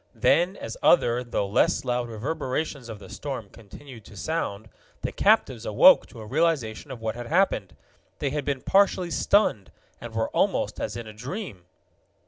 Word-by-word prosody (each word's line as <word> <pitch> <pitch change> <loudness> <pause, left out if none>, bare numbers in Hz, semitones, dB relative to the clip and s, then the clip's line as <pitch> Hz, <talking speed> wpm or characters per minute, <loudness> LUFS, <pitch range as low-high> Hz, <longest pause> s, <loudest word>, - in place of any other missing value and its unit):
Then, 180 +4 +2
as 115 - -7
other, 125 -7 +4
though 120 -4 -2
less 100 - +2
loud 120 -1 -1
reverberations 130 +2 -3
of 110 - -6
the 100 -1 -13
storm 125 -1 -6
continued 115 +3 -13
to 105 - -13
sound, 110 -5 -3 0.4
the - - -2
captives - - +2
awoke - - +6
to 115 - -12
a - - -8
realization 140 -3 0
of 125 -4 -8
what 110 -1 -2
had 120 0 -7
happened. 165 - +1 0.4
They 140 - -2
had 150 0 -2
been 140 -2 -2
partially 190 -3 +3
stunned, 140 - +2 0.3
and - - -8
were - - 0
almost - - 0
as - - -3
in 120 - -6
a 110 - -10
dream. 125 - -7
125 Hz, 170 wpm, -25 LUFS, 110-160 Hz, 0.4 s, awoke